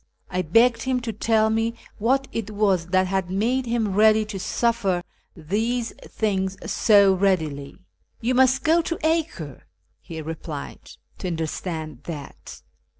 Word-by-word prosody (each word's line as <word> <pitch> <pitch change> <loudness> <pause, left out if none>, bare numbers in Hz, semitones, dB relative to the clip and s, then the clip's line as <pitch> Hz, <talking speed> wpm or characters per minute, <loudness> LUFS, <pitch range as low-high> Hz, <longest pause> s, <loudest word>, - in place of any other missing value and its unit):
I 185 - 0
begged 230 +7 +3
him 260 0 0
to 230 -2 -4
tell 220 +1 +2
me 225 +1 0 0.2
what 265 +5 +1
it 225 -2 -4
was 200 -5 +1
that 185 +1 +2
had 190 -1 -1
made 235 +7 0
him 230 -4 0
ready 215 +1 +5
to 205 -2 -6
suffer 195 -5 0 0.3
these 225 +9 -2
things 190 -3 -2
so 200 -3 +5
readily. 160 -8 0 0.4
"You 240 +3 0
must 260 +1 +4
go 330 +1 +4
to 335 0 -3
Acre," 315 - -2 0.3
he 160 - -8
replied, 155 -2 -7 0.2
" - - -40
to - - -4
understand 160 -3 -4
that." 150 -5 -9
205 Hz, 145 wpm, -24 LUFS, 175-235 Hz, 0.4 s, ready